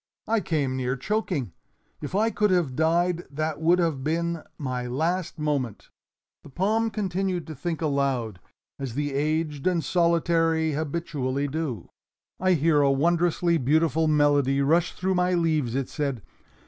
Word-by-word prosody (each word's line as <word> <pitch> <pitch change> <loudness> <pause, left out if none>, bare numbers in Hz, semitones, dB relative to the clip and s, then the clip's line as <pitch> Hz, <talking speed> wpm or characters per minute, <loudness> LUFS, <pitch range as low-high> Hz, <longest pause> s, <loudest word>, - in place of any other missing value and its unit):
I 225 0 +2
came 150 -8 -1
near 125 0 -1
choking. 170 - -2 0.5
If 150 +5 -5
I 220 +3 +2
could 210 -1 +1
have 175 -8 +1
died 170 +3 +1
that 155 +2 -3
would 170 +3 +4
have 165 -7 0
been 170 +2 -1 0.2
my 125 -3 -3
last 165 +8 -1
moment." 145 -7 -2 0.5
The - - -14
palm 215 +9 +1
continued 190 -4 -2
to 160 - -7
think 165 +3 -4
aloud, 135 - -1 0.4
as 130 -4 -5
the 145 0 -2
aged 150 +1 -1
and 175 -3 +1
solitary 165 -2 +2
habitually 145 -3 -2
do. 140 - -4 0.5
"I 185 0 +3
hear 155 -2 +3
a 140 - +4
wondrously 170 +3 +2
beautiful 160 +3 +2
melody 145 -2 +3
rush 165 +5 +2
through 190 +1 -1
my 180 0 +2
leaves," 155 -8 0
it 135 -1 -1
said. 140 - -3
160 Hz, 145 wpm, -25 LUFS, 140-175 Hz, 0.5 s, would